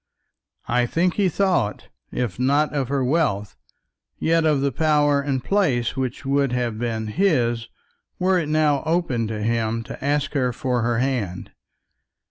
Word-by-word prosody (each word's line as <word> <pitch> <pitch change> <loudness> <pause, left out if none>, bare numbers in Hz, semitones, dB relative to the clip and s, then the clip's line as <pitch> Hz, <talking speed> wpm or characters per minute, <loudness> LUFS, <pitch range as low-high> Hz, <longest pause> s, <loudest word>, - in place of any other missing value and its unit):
I 120 +1 +2
think 170 +6 +1
he 200 -3 +2
thought, 180 - 0 0.2
if 120 -4 -3
not 145 +4 +2
of 140 -3 -1
her 135 0 0
wealth, 125 - 0 0.6
yet 165 0 +2
of 150 -3 +2
the 140 0 +1
power 145 0 +2
and 135 -3 -2
place 140 - +1
which 130 0 -3
would 140 -1 +1
have 120 -3 -1
been 115 -2 -2
his 120 - +1 0.5
were 185 0 +2
it 155 -3 -3
now 150 -3 +2
open 160 -9 0
to 105 -1 -4
him 115 0 0
to 130 - -9
ask 145 0 0
her 130 -4 +1
for 125 0 -1
her 115 0 0
hand. 120 -8 -2
135 Hz, 155 wpm, -23 LUFS, 120-155 Hz, 0.6 s, I